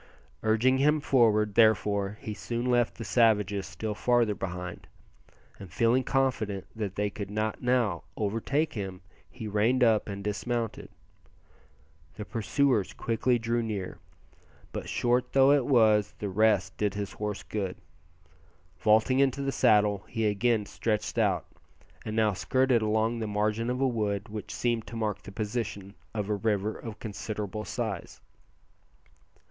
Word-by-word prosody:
Urging 115 +4 +3
him 150 +2 +4
forward, 110 -7 +3
therefore, 105 -2 +3
he 110 - -5
soon 120 +3 -4
left 120 -2 +2
the 115 - -5
savages 105 -4 +2
still 110 -1 -4
farther 120 -1 +2
behind, 90 -2 -6 0.7
and 95 -3 -10
feeling 115 +6 +2
confident 115 -8 0
that 105 -4 -4
they 105 0 -1
could 100 -1 -6
not 110 +1 -2
now 120 -8 +1
overtake 115 +9 0
him 95 -4 -5 0.3
he 115 -4 -7
reined 110 +5 +2
up 110 -3 +3
and 100 0 -5
dismounted. 110 +3 -3 1.3
The 105 - -6
pursuers 115 -1 +1
quickly 120 +2 +1
drew 115 +1 -1
near, 105 -5 -4 0.7
but - - -5
short 125 +1 +1
though 135 0 +6
it 140 -4 +3
was 105 -5 +4
the 105 - -4
rest 105 0 +2
did 105 -1 0
his 100 -1 -3
horse 105 -1 -4
good. 100 -4 -4 1.0
Vaulting 110 +5 +3
into 140 0 +2
the 135 - 0
saddle, 105 -4 +3
he 115 -1 -2
again 105 +1 +1
stretched 105 0 -2
out, - - +1 0.6
and 110 - -4
now 110 -2 +3
skirted 130 +4 +2
along 110 +2 +1
the 110 - -2
margin 105 +3 0
of 125 +1 -1
a 135 - +3
wood 105 -3 -2
which 105 0 -6
seemed 120 -3 -1
to 115 - -8
mark 105 -3 -2
the - - -10
position 105 -2 -4 0.2
of 105 -3 -3
a 105 - 0
river 105 0 0
of 110 -2 -8
considerable 105 -1 -5
size. - - -4
110 Hz, 145 wpm, -28 LUFS, 105-120 Hz, 1.3 s, though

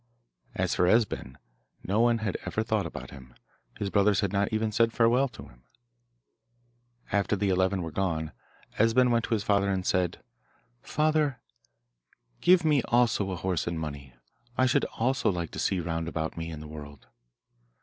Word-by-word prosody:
As - - 0
for 90 - +2
Esben, 105 - +1 0.5
no 100 +4 0
one 120 0 +4
had 100 - -1
ever 110 - -2
thought 110 -5 0
about - - -8
him; 65 -3 -13 0.4
his 100 -2 -3
brothers 100 -1 +3
had 100 -1 -1
not 100 0 +1
even 110 0 0
said 115 +1 +3
farewell 120 +4 +3
to 120 - -12
him. - - -21 1.5
After 100 0 +1
the 100 0 0
eleven 95 0 +1
were 80 - -5
gone 80 -3 -2 0.5
Esben 120 +3 +4
went 115 -1 +2
to 115 - 0
his 105 - -2
father 100 -1 +2
and 95 -2 -1
said, 90 -2 0 0.6
'Father, 155 -3 +1 1.0
give 180 -2 +5
me 150 -4 +4
also 120 -5 +2
a 95 - -2
horse 90 -1 -2
and 85 -1 -2
money; 70 -5 -7 0.4
I 130 - +4
should 125 - +2
also 130 +3 0
like 85 -3 -4
to - - -6
see 95 - 0
round 80 -1 -3
about 80 -1 -3
me 80 0 -5
in 80 -2 -7
the 75 - -9
world. 75 -2 -10
100 Hz, 170 wpm, -28 LUFS, 85-115 Hz, 1.5 s, give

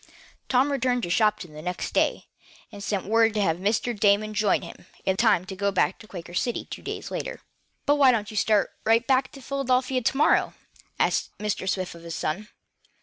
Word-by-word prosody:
Tom 265 +3 +3
returned 250 -3 0
to 170 - -2
Shopton 200 -5 +1
the 150 - -9
next 180 +2 -4
day, - - +1 0.5
and 200 - -9
sent 200 -1 -2
word 225 +1 +3
to 210 - +1
have 165 -3 +1
Mr. 210 +5 0
Damon 210 +1 +2
join 210 -2 +2
him 170 - -11 0.2
in 190 - +2
time 180 -1 +3
to 190 - -7
go 200 +1 0
back 190 -1 +1
to 215 - -13
the - - -32
Quaker 175 -2 -8
City 240 +6 -1
two - - -8
days - - -6
later. - - -4 0.4
"But 290 +1 +3
why 275 -3 +7
don't 215 -3 -1
you - - -9
start 210 -1 +2
right 230 +2 +3
back 260 0 +2
to 275 - -12
Philadelphia 260 -1 0
to 250 - 0
morrow," 295 - +3 0.4
asked - - 0
Mr. 210 -2 -2
Swift 185 -1 -2
of 170 - -12
his 170 -1 -6
son. 190 +8 -3
210 Hz, 205 wpm, -25 LUFS, 190-250 Hz, 0.5 s, why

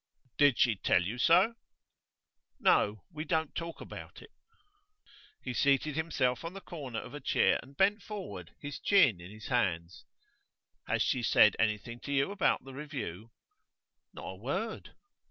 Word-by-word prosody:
'Did 145 -4 +5
she 115 -4 +3
tell 90 -2 +2
you 110 +7 -4
so?' 180 - +5 1.1
'No. 105 0 +3
We 155 -2 -5
don't 160 -2 -1
talk 165 -1 -5
about - - -9
it.' 445 - -16 1.1
He 125 - -4
seated 140 +3 +2
himself 130 -7 0
on 165 +2 -5
the 195 - -7
corner 145 -11 -7
of 125 - -9
a 145 - -6
chair 130 - +2
and 140 +1 -17
bent 205 +2 +3
forward, 140 - -8
his 145 -1 -6
chin 130 - +4
in 90 - -10
his 110 +1 -10
hand. 90 -9 0 1.0
'Has - - +1
she 130 - 0
said 105 -2 +5
anything 110 +2 -1
to 140 - -7
you 140 +6 +1
about 200 -1 +1
the 135 0 -11
review?' 125 - -6 0.8
'Not - - -9
a - - -6
word. - - -4
135 Hz, 155 wpm, -31 LUFS, 110-160 Hz, 1.1 s, Did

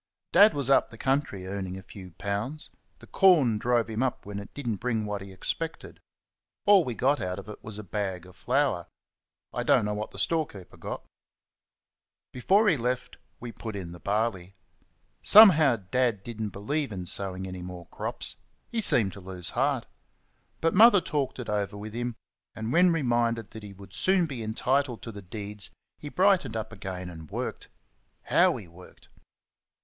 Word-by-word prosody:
Dad 210 -2 +7
was 140 -3 0
up 135 - +4
the 115 - -11
country 135 -8 -1
earning 95 -1 -4
a 95 - -10
few 95 -1 -11
pounds 105 - -3 0.3
the - - -15
corn 150 - +4
drove 120 0 +1
him 110 +1 -3
up 130 -2 -1
when 100 0 -5
it 100 - -10
did 145 -3 -6
n't 110 -4 -1
bring 115 -3 -1
what 105 -1 -4
he 100 0 -9
expected. 160 - -4 0.7
All 200 -3 +7
we 125 -5 -4
got 140 +5 +1
out 90 0 -3
of 100 - -9
it 105 - -10
was 110 -1 -4
a 105 - -6
bag 95 -3 -3
of 90 -1 -15
flour 130 - 0 0.7
I - - -2
do - - +3
n't - - +1
know 105 - -1
what 105 +1 -4
the - - -12
storekeeper 150 - -2
got. - - -6 1.3
Before 195 - +3
he 170 -7 +4
left 125 +1 -3 0.2
we 120 -1 -7
put 110 -2 -7
in 90 -4 -6
the 85 - -10
barley. 100 -3 -2 0.7
Somehow, 160 - +8
Dad 110 +1 0
did 115 -1 -7
n't 105 -2 -2
believe 140 +8 -2
in 90 -3 -5
sowing 95 +1 -1
any 90 -1 -7
more 90 -1 -8
crops, - - -4 0.3
he 230 - 0
seemed 110 - +5
to 100 - -10
lose 90 -2 -6
heart; 130 -1 0 0.8
but 165 0 +2
Mother 220 0 +8
talked 145 -6 -2
it 125 - -6
over 105 -1 -2
with 105 +1 -8
him, 120 0 -3 0.4
and 110 +2 -3
when 180 +2 +5
reminded 120 -7 0
that 110 - -9
he 105 -1 -9
would 100 0 -14
soon 185 - +3
be 135 -7 -6
entitled 125 +3 0
to 115 - -6
the 100 -1 -9
deeds 100 +1 -5 0.3
he 145 - -7
brightened 180 - +2
up 110 0 -5
again 95 -3 -6
and 80 -3 -10
worked. - - -5 0.6
How - - +4
he 95 - -10
worked! 85 +2 -16
110 Hz, 185 wpm, -27 LUFS, 100-135 Hz, 1.3 s, Somehow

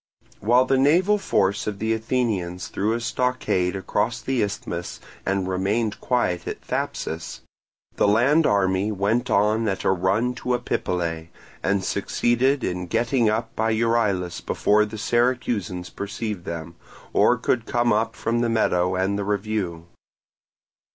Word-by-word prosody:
While 120 +5 +4
the 130 0 +2
naval 180 +9 +4
force 100 - +1
of 105 -2 -2
the 110 +2 0
Athenians 110 -6 -2
threw 105 +3 0
a 115 - -1
stockade 120 -6 0
across 95 - -1
the 130 -2 -1
isthmus 100 -4 -4 0.3
and 95 -1 0
remained 100 +4 -1
quiet 90 -9 0
at - - -4
Thapsus, 80 +1 -4 0.6
the - - +3
land 135 +10 +4
army 95 -1 +2
immediately 105 -3 -4
went 115 +5 +1
on 110 +2 +2
at 95 -2 -2
a - - +3
run 95 +7 +1
to 125 0 0
Epipolae, 85 -8 -2 0.3
and 95 +1 0
succeeded 120 +7 +1
in 90 0 -2
getting 115 +2 +2
up 115 +1 -2
by 110 +1 +1
Euryelus 110 -6 0
before 105 +1 +2
the 110 +1 -8
Syracusans 115 -6 0
perceived 100 -2 -5
them, 85 0 -5 0.4
or - - +4
could 120 -2 0
come 120 -1 +2
up 110 +1 0
from 120 +1 -1
the 120 - +1
meadow 90 -5 +1
and 95 +2 0
the - - -1
review. 100 -5 -2
105 Hz, 145 wpm, -24 LUFS, 95-120 Hz, 0.6 s, While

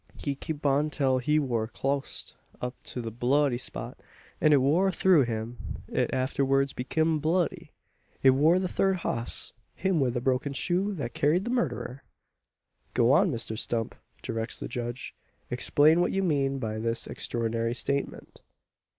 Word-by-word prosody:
He 140 - -2
kep 145 +2 -6
on 145 +2 +3
till 135 -3 +1
he 150 +5 +2
war 120 -7 0
clost 135 +3 -3 0.3
up 125 0 -3
to 125 - -5
the 115 - -4
bloody 125 +2 +2
spot; - - -6 0.4
an 155 - +5
it 145 - +6
war 165 +9 +3
through 180 -7 +4
him 115 +1 -4 0.3
it - - 0
arterwards 135 +1 +1
bekim 160 +5 0
bloody. 170 +3 0 0.5
It 135 - +8
war 155 +7 +4
the 185 0 0
third 190 +1 +1
hoss 115 +1 0 0.2
him 190 -4 +1
wi' 135 -3 +2
the 120 0 -1
broken 130 +2 0
shoe 185 +8 0
thet 135 -8 -4
carried 155 +6 +2
the 240 - -3
murderer!" 185 - -2 0.9
"Go 120 +1 +4
on, 180 +7 +5
Mr 115 -5 -3
Stump!" 115 0 -2 0.3
directs 115 0 -4
the - - -5
judge. 120 +1 -5 0.4
"Explain 150 +6 +4
what - - +1
you 195 - 0
mean 140 -5 +1
by 110 -4 -3
this 115 +1 -1
extraordinary 115 0 -2
statement." 140 +3 -3
135 Hz, 160 wpm, -28 LUFS, 120-155 Hz, 0.9 s, It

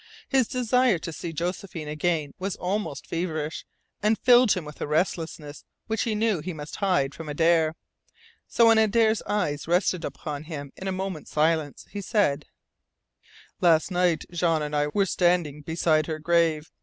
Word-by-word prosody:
His 265 -4 +2
desire 250 -3 +2
to 165 0 -6
see 165 - -5
Josephine 170 0 -4
again 150 -1 -1
was 190 0 -3
almost 190 -5 -3
feverish, 160 -3 -3 0.4
and 215 +1 +2
filled 245 -2 +5
him 180 -4 -4
with 150 0 -11
a - - -2
restlessness 155 -2 -2 0.2
which 220 -1 -1
he 225 -2 -1
knew 215 -4 +1
he 175 +4 -5
must 150 -1 -8
hide 180 -9 +1
from 165 -2 -8
Adare. 160 +1 +2 0.7
So 235 - +3
when 225 -1 +6
Adare's 220 0 +3
eyes 155 -9 -1
rested 175 0 +1
upon 150 -2 -5
him 145 -4 -7
in 190 - -7
a - - 0
moment's 185 -4 -4
silence, 155 -1 0
he 205 - -5
said: 190 - +1 1.1
"Last 165 +1 +3
night 180 -2 +1
Jean 165 -3 +1
and 150 0 -3
I 145 0 +2
were 195 +6 +1
standing 175 -5 +1
beside 155 0 +1
her 160 -2 -3
grave. 165 -1 +1
170 Hz, 165 wpm, -26 LUFS, 155-195 Hz, 1.1 s, when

